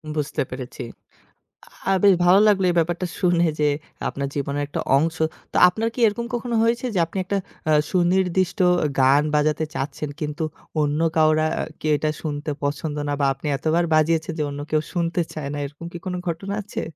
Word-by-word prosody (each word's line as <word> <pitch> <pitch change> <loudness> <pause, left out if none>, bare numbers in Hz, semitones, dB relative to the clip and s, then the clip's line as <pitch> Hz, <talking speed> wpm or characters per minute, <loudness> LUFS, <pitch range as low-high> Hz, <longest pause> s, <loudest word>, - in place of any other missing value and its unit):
বুঝতে 150 -2 -1
পেরেছি। 125 -1 -7 1.1
আ - - +4
বেশ 200 -2 +7
ভালো 180 +3 +6
লাগলো 195 -2 +3
এই - - -1
ব্যাপারটা 175 +2 0
শুনে 175 -2 +3
যে 150 - +4 0.4
আপনার 140 0 -3
জীবনের 140 0 -2
একটা 145 - -4 0.2
অংশ। 160 +3 +1 0.4
তো - - -3
আপনার 220 +5 -1
কি - - -5
এরকম 235 +3 -1
কখনো 240 0 -2
হয়েছে 235 +2 +1
যে, - - +1
আপনি 170 - -6
একটা 200 +2 -1 0.3
আ - - +5 0.2
সুনির্দিষ্ট 185 +1 +1 0.4
গান 135 +3 +5
বাজাতে 150 +1 +2
চাচ্ছেন 145 +1 -4
কিন্তু 150 +1 -3 0.4
অন্য 150 +1 0 0.2
কেউ 155 0 +4 0.3
কি - - -5
এটা 155 +1 0
শুনতে 150 -1 -3
পছন্দ 145 +1 -2
না - - 0
বা 140 - +3
আপনি 135 +3 -9
এতবার 160 +4 +1
বাজিয়েছেন 160 +1 +2
যে - - +1
অন্য 140 0 -6
কেউ 155 -1 +2
শুনতে 170 0 0
চায় 150 -3 -5
না। 145 - -4
এরকম 145 +4 -10
কি 175 - -6
কোন 185 - -2
ঘটনা 195 +5 -3
আছে? 210 - -5
160 Hz, 180 wpm, -23 LUFS, 145-180 Hz, 1.1 s, বেশ